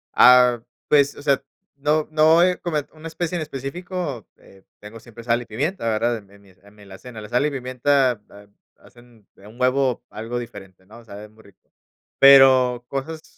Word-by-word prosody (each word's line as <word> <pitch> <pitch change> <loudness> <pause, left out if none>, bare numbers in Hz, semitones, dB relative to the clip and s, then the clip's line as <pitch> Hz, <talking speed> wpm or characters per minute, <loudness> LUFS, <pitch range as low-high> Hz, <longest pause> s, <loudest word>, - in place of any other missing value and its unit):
Ah, 125 -1 +6 0.3
pues, 145 -1 +3
o - - -12
sea, 140 -2 +1 0.3
no 150 +2 -1
no, 160 +2 +4
eh, 180 0 +1
como 170 -3 -3 0.2
una 160 +1 -11
especie 170 +2 -4
en 170 - -3
específico, 150 - -6
eh, 95 0 -21 0.2
tengo 105 +2 -12
siempre 115 0 -14
sal 120 0 0
y - - -10
pimienta, 140 - -3
¿verdad?, 115 +2 -1
en 100 -3 -16
en 100 0 -20
mi 100 - -22
en 100 +3 -23
mi 105 - -18
alacena, 100 +4 -12
la 105 -1 -10
sal 125 +5 0
y - - -4
pimienta 130 -2 0
ha 100 0 -16 0.3
hacen 120 -3 -21
un 105 +5 -16
huevo 130 -1 0
algo 115 +3 -6
diferente, 95 -6 -10
¿no?, 115 +4 -16
sabe 105 -1 -12
muy 110 +1 -22
rico, 100 -2 -25 0.5
pero, 130 -3 +6
cosas. 155 +4 -6
125 Hz, 185 wpm, -21 LUFS, 110-145 Hz, 0.5 s, Ah